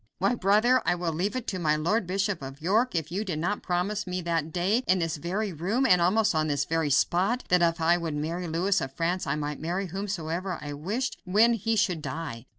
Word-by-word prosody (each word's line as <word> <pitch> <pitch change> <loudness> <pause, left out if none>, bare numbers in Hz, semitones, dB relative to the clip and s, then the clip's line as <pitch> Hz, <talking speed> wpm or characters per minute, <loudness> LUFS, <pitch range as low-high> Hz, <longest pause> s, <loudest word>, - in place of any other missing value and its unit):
"Why! 195 +6 +2
brother, 225 +4 +3
I - - +2
will 175 -2 -2
leave 190 +7 -1
it 255 -2 -3
to 185 - -3
my 155 -3 +2
Lord 175 +6 0
Bishop 195 -1 -1
of 135 +1 -8
York 210 +8 +1
if 160 -1 -2
you 195 +4 -1
did 180 -7 -3
not 175 +6 -1
promise 190 +4 -1
me 180 0 -2
that 165 -2 -1
day, 185 +8 +1
in 185 - +4
this 165 -3 -1
very 190 +6 -2
room, 200 - 0
and 180 -8 +5
almost 205 +5 +3
on 155 -1 +1
this 145 -2 0
very 160 -1 0
spot, 185 - +2
that 180 -1 +4
if 170 -1 +2
I 170 +2 +3
would 165 -3 -3
marry 165 +4 -3
Louis 180 +5 +1
of 135 0 -4
France 175 +4 -1
I - - 0
might 150 -1 -4
marry 180 +5 -2
whomsoever 185 -1 -3
I 145 -1 -6
wished 210 - -3
when 215 +6 +4
he 225 0 0
should 190 -7 +1
die. 140 -4 -6
175 Hz, 230 wpm, -27 LUFS, 160-200 Hz, -, and